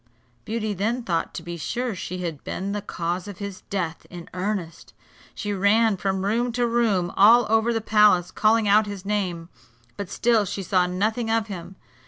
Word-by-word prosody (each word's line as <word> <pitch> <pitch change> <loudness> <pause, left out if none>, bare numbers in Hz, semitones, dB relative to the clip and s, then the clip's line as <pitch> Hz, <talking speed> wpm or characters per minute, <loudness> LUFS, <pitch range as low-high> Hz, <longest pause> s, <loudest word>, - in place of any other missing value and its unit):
Beauty 220 -1 -2
then 225 +6 -1
thought 170 -6 -1
to 170 - -6
be 170 0 -6
sure 240 +9 -2
she 180 0 -5
had 165 -5 -5
been 195 +2 -4
the 205 0 -2
cause 175 -1 -3
of 200 -3 -8
his 200 -2 -7
death 170 -5 -3
in 175 -2 -10
earnest. 185 -2 -4 0.4
She 205 -1 -3
ran 205 +3 +3
from 190 0 -2
room 235 +4 +1
to 245 +1 +1
room 220 -7 +1
all 230 +4 +7
over 225 +1 +3
the 225 -1 -1
palace, 210 -5 +4
calling 220 0 +3
out 210 +1 +4
his 200 -2 -7
name, 185 -5 -2 0.5
but 200 -3 -5
still 230 -2 +2
she 195 +1 -4
saw 180 0 +2
nothing 215 +6 -1
of 225 -1 +1
him. 180 -1 -7
200 Hz, 185 wpm, -24 LUFS, 180-220 Hz, 0.5 s, all